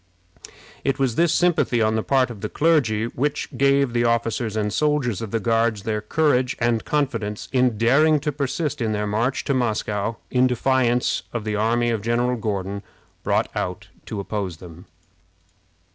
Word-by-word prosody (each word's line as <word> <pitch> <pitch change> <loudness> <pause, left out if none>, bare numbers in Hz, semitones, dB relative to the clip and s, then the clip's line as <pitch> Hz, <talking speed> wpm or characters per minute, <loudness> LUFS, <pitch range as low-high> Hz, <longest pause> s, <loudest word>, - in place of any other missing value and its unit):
It 135 -1 0
was 135 -3 +1
this 170 +6 +2
sympathy 170 -8 +2
on 110 -1 +2
the 110 - +1
part 130 0 +1
of 105 -4 -10
the 105 - -3
clergy 130 -9 +2
which 140 +5 -3
gave 140 -2 +2
the 120 0 +2
officers 115 -1 0
and 105 -1 -1
soldiers 145 -7 0
of 115 - -4
the 115 - -1
Guards 115 -1 +1
their 105 0 -2
courage 130 +1 +1
and 115 -2 +1
confidence 115 -8 -2
in 125 -4 +2
daring 145 +7 +4
to 150 0 -1
persist 145 0 -2
in 110 -2 0
their 105 0 -1
march 115 +5 -1
to 140 - 0
Moscow 110 -3 -1 0.2
in 125 0 +4
defiance 125 -1 +1
of 120 -3 -3
the 105 0 -2
army 120 +3 +1
of 110 -3 -1
General 120 +3 +1
Gordon, 100 -3 -3 0.4
brought - - 0
out - - -4 0.2
to 105 - -4
oppose 100 -4 -4
them. 85 0 -12
120 Hz, 170 wpm, -23 LUFS, 110-135 Hz, 0.4 s, daring